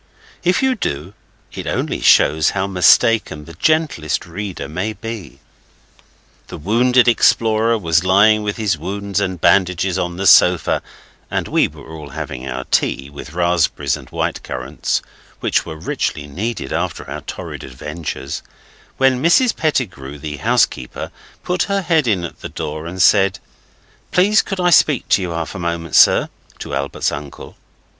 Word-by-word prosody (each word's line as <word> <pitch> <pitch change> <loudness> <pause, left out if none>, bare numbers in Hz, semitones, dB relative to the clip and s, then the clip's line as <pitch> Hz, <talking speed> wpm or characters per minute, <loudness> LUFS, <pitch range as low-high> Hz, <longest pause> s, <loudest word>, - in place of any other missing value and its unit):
If 180 +8 +2
you 265 -1 +3
do, 85 - -4 0.4
it - - -6
only - - -2
shows 75 +1 +4
how 95 - +1
mistaken 95 -2 +3
the 85 - -11
gentlest 150 - 0
reader 95 +2 -6
may 90 +7 -3
be. 110 -9 -8 1.1
The - - -8
wounded 125 +8 +3
explorer 115 -1 +3
was 85 -4 +1
lying 100 +3 +4
with 105 -1 -3
his 100 -8 0
wounds 100 +3 -3
and 95 -3 -2
bandages 95 0 +2
on 85 -1 -3
the 100 - -3
sofa, 90 -2 +5 0.5
and - - -2
we - - +2
were - - -14
all 75 -2 -9
having 65 -1 -6
our 65 +1 -4
tea, 70 +1 0
with 70 +1 -10
raspberries 85 -1 +1
and - - -12
white - - -2
currants, 65 0 -3 0.4
which - - 0
we 80 - -6
richly 75 -1 -3
needed 95 - -4
after - - -3
our - - -6
torrid - - -7
adventures, 75 +2 -6 0.6
when 130 -1 +3
Mrs 215 - +4
Pettigrew, 95 - -2
the 75 0 -6
housekeeper, 65 -2 0 0.3
put 180 0 -1
her 200 -1 0
head 165 -6 +2
in 95 -6 +1
at 85 - -7
the - - -6
door 75 +2 -5
and 90 +2 -7
said 95 0 +4 0.7
'Please 205 +4 +4
could 195 -2 -5
I 180 -1 +2
speak 145 -6 +4
to - - +3
you 90 - -3
half 85 -1 -4
a - - -7
moment, 85 -2 -4
sir?' - - +5 0.3
to - - -7
Albert's 70 +1 -1
uncle. 70 -1 -8
95 Hz, 155 wpm, -18 LUFS, 80-115 Hz, 1.1 s, sofa